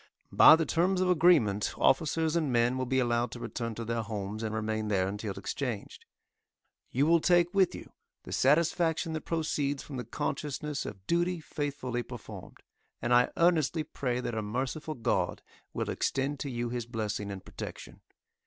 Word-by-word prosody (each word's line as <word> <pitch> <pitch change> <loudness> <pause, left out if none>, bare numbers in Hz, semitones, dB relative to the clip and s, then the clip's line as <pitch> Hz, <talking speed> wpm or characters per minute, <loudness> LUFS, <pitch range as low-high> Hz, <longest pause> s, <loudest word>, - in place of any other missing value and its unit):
By 155 - +9
the 165 0 0
terms 180 +4 +1
of 185 0 +3
agreement 150 - +3
officers 160 +3 +2
and 155 -5 +1
men 120 +1 +2
will 130 -1 -2
be 130 +1 +1
allowed 120 -1 +1
to 120 - -7
return 115 -1 -4
to 115 - -5
their 115 0 -1
homes 105 -1 -5
and 110 -1 -3
remain 110 0 -2
there 95 -3 +1
until 100 0 -4
exchanged. 110 +2 -5 0.8
You 135 +4 +1
will 170 +1 +5
take 175 0 +3
with 195 -2 +3
you - - -10 0.3
the - - -10
satisfaction 160 +3 +2
that 155 - -4
proceeds 145 -4 -1
from 140 - -7
the 125 - -3
consciousness 145 +3 -3
of 95 -2 -9
duty 175 - +1
faithfully 145 -6 -3
performed; - - -10 0.4
and 120 - 0
I 125 0 +5
earnestly 165 -2 +3
pray 125 -4 -2
that 120 - -3
a 110 - -1
merciful 130 +8 -3
God 120 -1 -1 0.3
will - - -2
extend 135 +1 -1
to 140 - -3
you 120 -1 -2
His 120 -1 -4
blessing 105 -3 -3
and 95 -2 -7
protection. - - -8
130 Hz, 170 wpm, -30 LUFS, 115-155 Hz, 0.8 s, By